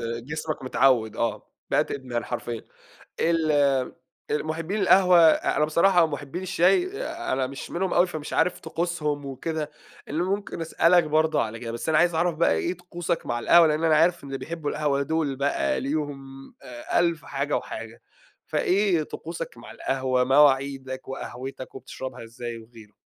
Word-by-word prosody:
جسمك 135 +7 -4
متعوّد، 130 -4 +2
آه، 115 - -2 0.2
بقت - - +2
إدمان 125 -4 -3
حرفيًا. 120 -2 -4 0.6
ال 165 -2 +2 0.8
المُحبّين 160 +7 -2
القهوة 185 -2 +6
أ 160 -2 +4
أنا 150 - +3
بصراحة 175 +3 +4
ومُحبّين 150 +2 -4
الشاي، 195 - +2
آآ، 325 - -3
أنا 130 0 0
مش 135 +1 -8
منهم 185 +2 -1
أوي، 175 +1 +4
فمش 155 -4 -6
عارف 180 - +1
طقوسهم 160 -3 -2
وكده، 150 +3 -4 0.4
اللي 155 +4 -1
ممكن 195 -2 -3
أسألك 165 +2 +4
برضه 155 0 +2
على 115 +1 -4
كده، 115 -1 -5
بس 120 +7 -4
أنا 155 - +3
عايز 175 -1 +3
أعرف 170 0 +1
بقى 165 - +3
إيه 175 - -1
طقوسك 175 -1 -4
مع 120 - -2
القهوة، 170 +7 +6
لإن 155 +1 0
أنا 160 -1 +4
عارف 170 +2 +3
إن 135 -1 -5
بيحبوا 160 0 -5
القهوة 145 -2 0
دول 150 -1 -1
بقى 140 +2 0
ليهم 145 0 -3 0.4
آآ، 120 +5 -2
ألف 170 -3 0
حاجة 140 +1 -1
وحاجة، 115 +1 -8 0.4
فإيه 185 -4 +1
طقوسك 165 -1 -7
مع 115 - -11
القهوة، 130 -1 0
مواعيدك 135 -1 +2
وقهوتك 130 0 -7
وبتشربها 130 -2 -7
إزاي 120 0 -7
وغيره؟ 110 -2 -15
150 Hz, 155 wpm, -25 LUFS, 130-170 Hz, 0.8 s, القهوة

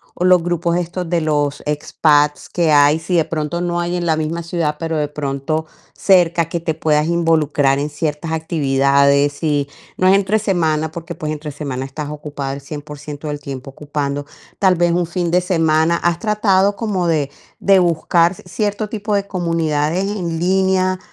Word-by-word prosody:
o 180 - -1
los 180 -2 +5
grupos 170 0 0
estos 175 0 -3
de 170 -2 +1
los 145 -2 0
expats 150 0 +1
que 170 -3 +1
hay, 145 +2 +5
si 175 +2 -2
de 165 - +3
pronto 160 +2 -3
no 175 0 -1
hay 175 +1 -1
en 175 -1 -2
la 160 -1 +2
misma 160 +2 -3
ciudad, 165 -3 -1
pero 165 -1 -2
de 150 -1 0
pronto 145 +2 -3 0.3
cerca 175 -3 +3
que 170 - -2
te 160 -1 -2
puedas 155 -1 +1
involucrar 155 -5 +2
en 145 - -2
ciertas 150 +2 -3
actividades 140 -2 +2
y 145 -3 0 0.3
no 185 - +3
es 190 - +6
entre 200 +2 +2
semana, 160 -6 0
porque 170 0 -7
pues 155 -3 -4
entre 150 0 -5
semana 140 -3 -4
estás 145 +2 -6
ocupada 145 -2 -5
el 140 - -7
100% 150 +1 -8
del 145 - -4
tiempo 135 -1 -7
ocupando, 145 0 -4 0.3
tal 190 -2 +4
vez 175 0 +2
un 175 -1 0
fin 170 -1 -2
de 180 +1 +3
semana, 165 -1 +2
¿has 170 -1 0
tratado 205 -2 +2
como 195 -5 -1
de, 145 -4 0 0.3
de 195 -1 +5
buscar 170 +1 +2
cierto 205 +4 -3
tipo 210 -1 -2
de 200 0 0
comunidades 165 -1 0
en 180 -5 -3
línea 185 +1 +1
165 Hz, 180 wpm, -18 LUFS, 150-175 Hz, 0.3 s, es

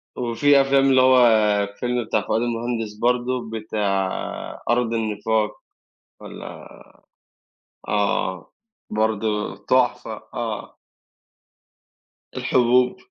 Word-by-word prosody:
وفي 135 +4 +3
أفلام 135 0 +3
اللي 130 -1 +5
هو 130 -1 +6 0.4
الفيلم 120 +3 -2
بتاع - - 0
فؤاد 110 +2 -1
المهندس 115 -2 -2
برضه 120 +1 -1
بتاع 105 -3 -1 0.6
أرض 120 -1 +1
النفاق 110 -1 -1 0.6
والّا - - -10 1.2
آه، 100 -3 -1 0.4
برضه 110 -1 -1
تحفة، 125 -4 +1
آه. 115 -3 -5 1.6
الحبوب. 125 0 +2
115 Hz, 80 wpm, -22 LUFS, 110-125 Hz, 1.6 s, هو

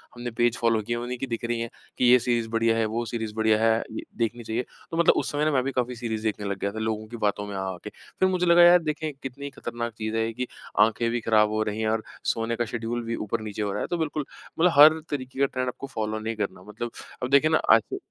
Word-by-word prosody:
हमने 120 0 -5
page 120 +1 +1
follow 115 -2 +2
किए 120 +3 -3
हैं, 120 - -3
उन्हीं 125 +1 -4
की 135 - -4
दिख 115 -1 -3
रहीं 120 0 -1
हैं 115 - -3 0.3
कि - - +2
ये 125 +1 +7
सीरीज़ 120 -2 0
बढ़िया 115 0 +2
है, 115 - +2
वो 115 +2 -2
सीरीज़ 110 -1 -4
बढ़िया 110 -1 +3
है, 115 0 +4
द 110 - -5 0.2
देखनी 115 +1 -1
चाहिए। 115 +2 -2 0.3
तो 165 - -3
मतलब 170 - +5
उस - - 0
समय 150 +1 0
ना 155 - +2
मैं 130 -3 +2
भी 135 - -2
काफ़ी 125 -1 -1
सीरीज़ 110 -2 -4
देखने 105 -1 -2
लग 100 -1 -3
गया 100 - -1
था 110 - -6
लोगों 110 -1 -2
की 120 +2 -8
बातों 105 -1 0
में 100 - -6
आ-आ 95 -1 -3
के। - - -6 0.3
फिर 185 - +4
मुझे 180 -1 +1
लगा 170 0 +7
यार 175 +1 +8
देखें 155 0 -2
कितनी 140 +2 -6
खतरनाक 120 -4 -5
चीज़ 110 0 -3
है 115 0 +1
ये 115 - -4
कि 125 +2 -3 0.3
आँखें 110 +2 +3
भी 120 - 0
खराब 110 -1 +4
हो 110 0 -1
रही 105 +1 -3
हैं 110 - +1
और 110 0 0 0.3
सोने 115 +1 -2
का 120 - -1
शेड्यूल 120 +1 -3
भी 115 0 -2
ऊपर 105 0 -3
नीचे 105 -1 -5
हो 100 -1 -1
रहा - - -3
है। - - -2
तो 175 - -1
बिल्कुल 155 -2 -2 0.3
मतलब 175 +2 +5
हर 155 +2 +9
तरीके 130 -2 -5
का 140 - +5
ट्रेंड 130 -1 -2
आपको 125 +2 -5
फ़ॉलो 110 -4 -3
नहीं 110 +1 -3
करना। 100 -3 -4
मतलब 105 +4 -6 0.3
अब 125 - -1
देखिए 140 +3 +5
ना 160 - +5 0.2
आज 115 -1 +2
115 Hz, 280 wpm, -26 LUFS, 110-125 Hz, 0.3 s, हर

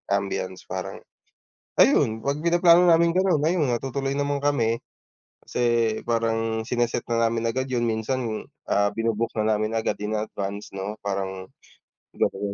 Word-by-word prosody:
ambiance 95 -2 -3
parang, - - -5 0.8
ayun, 110 0 +4
pag-pinaplano 170 +6 +4
naming 170 +1 +4
ganon 185 -4 +3
ayun 155 -3 +1
natutuloy 135 +3 -2
naman 140 0 -1
kami. 120 -6 +2 0.7
Kasi 120 -2 +1
parang 115 -1 0
sine-set 120 +1 -1
na 115 0 +2
namin 115 0 0
agad 130 +3 -1
yun 130 -2 -1
minsan 115 0 -2 0.2
ah, 100 0 +2
binu-book 115 0 -1
na 110 0 0
namin 110 +1 -2
agad 115 -1 -1
in 105 +1 -3
advance 105 -1 -4
no 95 +2 -5
parang, 95 -2 -4 0.7
ganon 95 - 0
115 Hz, 135 wpm, -25 LUFS, 110-135 Hz, 0.8 s, ayun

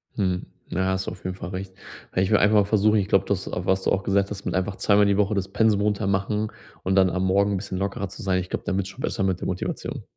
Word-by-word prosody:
Mhm, 90 -3 0 0.2
ja, 95 +2 0
hast 95 0 -1
du - - -2
auf - - -11
jeden 95 0 -3
Fall 90 - -7
recht. 95 0 -6 0.4
Ja, 95 - +3
ich 95 - +1
will 105 - +6
einfach 105 +2 +4
mal 105 -1 +5
versuchen 105 +1 +3
ich 95 - -1
glaube, 95 - +3
das, 95 -2 -1
was 95 +1 0
du - - +1
auch 95 - +1
gesagt 100 0 +1
hast, 100 -1 -6
mit 90 - -1
einfach 95 +1 -1
zweimal 105 0 +4
die 100 -1 +2
Woche 105 +1 +2
das 95 -1 -1
Pensum 105 0 +2
runter 105 -1 0
machen 105 +2 0 0.3
und 95 +1 +1
dann 95 -1 +5
am 95 +2 -1
Morgen 100 +2 +3
'n - - 0
bisschen 95 -1 -5
lockerer 100 0 -2
zu 105 - -10
sein. 95 -1 +1
Ich 90 0 -5
glaube, - - -3
dann 95 - 0
wird's 95 -1 -2
schon 110 +7 -11
besser 100 - -1
mit 95 -2 0
der - - -4
Motivation. 90 -1 -4
95 Hz, 290 wpm, -24 LUFS, 95-100 Hz, 0.4 s, will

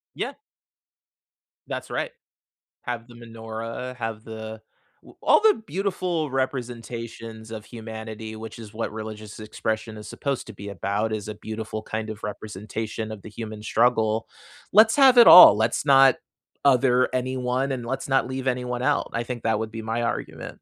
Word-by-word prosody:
Yeah. - - -3 1.3
That's - - -5
right. - - -2 0.7
Have 120 -2 -4
the 120 - -15
menorah, 115 +2 -7
have 115 -2 -5
the 110 0 -7 0.4
we - - -15
all - - +5
the 435 - +4
beautiful 180 -5 -2
representations 115 -3 -4
of 110 -1 -7
humanity, 110 -1 -8
which 110 +1 -8
is 105 -1 -10
what 115 -1 -4
religious 110 -1 -7
expression 110 +1 -3
is 105 - -9
supposed 140 -3 -3
to 110 - -9
be 100 +1 -9
about, 100 +3 -2
is 105 -1 -3
a 105 - -4
beautiful 110 0 -6
kind 110 0 -4
of 110 -1 -7
representation 110 +1 -5
of 110 -2 -8
the - - -9
human 110 0 -7
struggle. 115 -1 +2 0.4
Let's 220 +2 +7
have 265 -3 +7
it 235 - +10
all. 140 - +11
Let's 110 +6 0
not 135 -2 +6 0.5
other 125 -2 +4
anyone, 130 +1 -1
and 125 -2 -4
let's 135 +3 -4
not 135 -1 +2
leave 130 0 -4
anyone 125 -1 -1
out. 145 +2 +1
I 115 +1 -2
think 120 -1 -5
that 110 -2 +1
would 110 0 -4
be 110 -1 -6
my 115 +2 -2
argument. 120 +1 -3
115 Hz, 165 wpm, -25 LUFS, 110-125 Hz, 1.3 s, all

